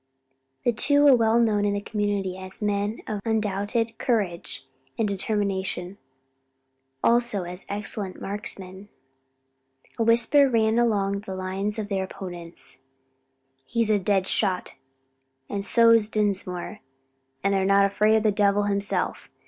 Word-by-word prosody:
The 240 - +3
two 285 +6 +3
were 280 -3 +7
well 230 0 +3
known 215 -3 +2
in 205 0 +1
the - - -1
community 205 -3 -2
as 185 0 -7
men 205 0 -1
of 210 -2 -4
undoubted 220 +1 -1
courage 200 -8 -2 0.3
and 225 - +1
determination; 195 -2 -2 1.0
also 235 -4 +2
as 180 +2 -7
excellent 200 -1 -3
marksmen. 195 -1 -5 1.1
A - - +3
whisper 240 +5 +5
ran 225 -1 +2
along 200 -4 +1
the 195 -2 -7
lines 190 +3 -3
of 215 -2 -3
their 195 -2 -1
opponents. 175 -6 -7 0.8
"He's 230 - 0
a 210 - +3
dead 190 0 +1
shot; 190 -4 0 0.7
and 200 -1 -4
so's 230 +1 +5
Dinsmore; 200 -2 -2 0.6
and 200 0 +2
they're 195 -1 +1
not 195 +1 +4
afraid 210 +2 +2
o' - - +4
the 215 -1 +2
devil 200 0 +2
himself. 200 0 -1
205 Hz, 130 wpm, -25 LUFS, 195-220 Hz, 1.1 s, were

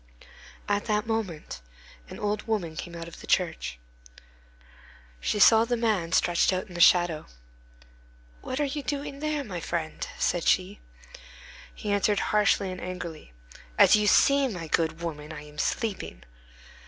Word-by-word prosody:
At 205 0 0
that 210 0 0
moment 195 - -4 0.5
an - - -8
old 210 +1 -2
woman 185 -8 -2
came 170 +2 -7
out 165 0 -7
of 170 - -11
the - - -11
church. 160 - 0 1.4
She 210 - -1
saw 220 +2 +7
the 240 +1 -1
man 210 -8 0
stretched 175 0 +3
out 185 0 -2
in 180 - -13
the 175 - -2
shadow. 175 -3 +4 1.1
"What 260 - -4
are 295 - +2
you 285 +1 -3
doing 280 +1 -4
there, 305 -1 -1
my 190 -8 -6
friend?" 165 -1 -4
said 175 -2 0
she. 190 +2 +1 1.0
He 210 - -4
answered 205 0 +2
harshly 205 -2 +3
and 185 - -7
angrily: 180 - -7 0.5
"As - - +7
you 210 0 +2
see, 275 +5 +5
my 180 -9 -5
good 160 +1 0
woman, 155 -2 -5
I 150 -1 -8
am 150 0 -12
sleeping." 195 - -2
185 Hz, 155 wpm, -27 LUFS, 165-220 Hz, 1.4 s, saw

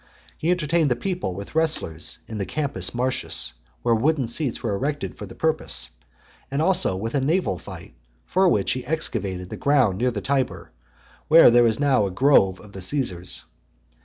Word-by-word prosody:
He 160 - -2
entertained 165 -3 +1
the 120 - +2
people 180 - -3
with 100 +1 -8
wrestlers 155 - 0
in 110 -1 -7
the 100 - -2
Campus 120 - -1
Martius, 120 - 0 0.3
where 115 - +3
wooden 135 +3 +1
seats 125 +1 -1
were 110 -4 -1
erected 145 +8 -3
for - - -8
the - - -12
purpose; 160 0 +1 0.6
and 140 - -2
also 165 - +2
with 115 +4 -4
a 140 - +1
naval 140 - 0
fight, - - -11 0.3
for 190 0 +3
which 100 - +1
he 130 0 -3
excavated 95 - -2
the - - -5
ground 130 -10 +2
near 125 +1 +2
the 115 -4 -3
Tiber, 135 +3 -2 0.6
where 160 -5 +8
there 120 0 +5
is 110 -1 0
now 135 -7 +3
the - - -2
grove 95 -4 +3
of 105 - -14
the 95 - -8
Caesars. 95 -5 -2
125 Hz, 180 wpm, -23 LUFS, 100-150 Hz, 0.6 s, where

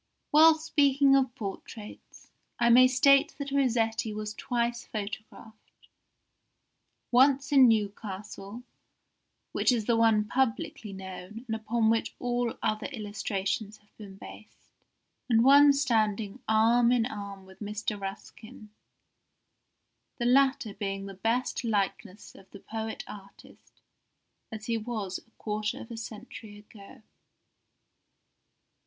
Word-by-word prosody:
While 315 +2 +7
speaking 280 -3 +3
of 260 -2 +1
portraits, 210 0 -9 0.3
I 235 0 +3
may 255 +2 +8
state 275 +2 +4
that 280 -1 -5
Rossetti 230 -5 0
was 215 0 -5
twice 235 +1 -2
photographed, 215 +1 -9 1.2
once 275 +3 +4
in 270 -3 +7
Newcastle 205 0 -3 0.9
(which - - +2
is 230 -4 0
the 235 - +2
one 225 -2 +3
publicly 225 -2 -2
known, 190 +3 -9
and 225 -2 -3
upon 220 +1 +1
which 225 - -1
all 245 -1 -2
other 215 0 -1
illustrations 205 -2 -3
have 210 0 -33
been 200 -3 -11
based), 215 - -14 0.6
and 230 -1 +4
once 280 +1 +6
standing 220 -2 0
arm 230 +2 +4
in 240 -2 +2
arm 200 -4 -7
with 190 0 -17
Mr. 210 0 -4
Ruskin, 210 +3 -9 1.5
the 240 - -2
latter 265 -2 +3
being 195 -1 -4
the 195 - -8
best 230 +7 -1
likeness 205 -2 -3
of 195 - -17
the 200 - -12
poet 220 +2 -6
artist 200 -1 -15 0.7
as 220 -1 -7
he 230 -1 -1
was 215 -4 -4
a - - -27
quarter 210 0 -3
of 230 - -11
a - - -5
century 215 -1 -9
ago. 210 +3 -15
220 Hz, 120 wpm, -28 LUFS, 210-245 Hz, 1.5 s, may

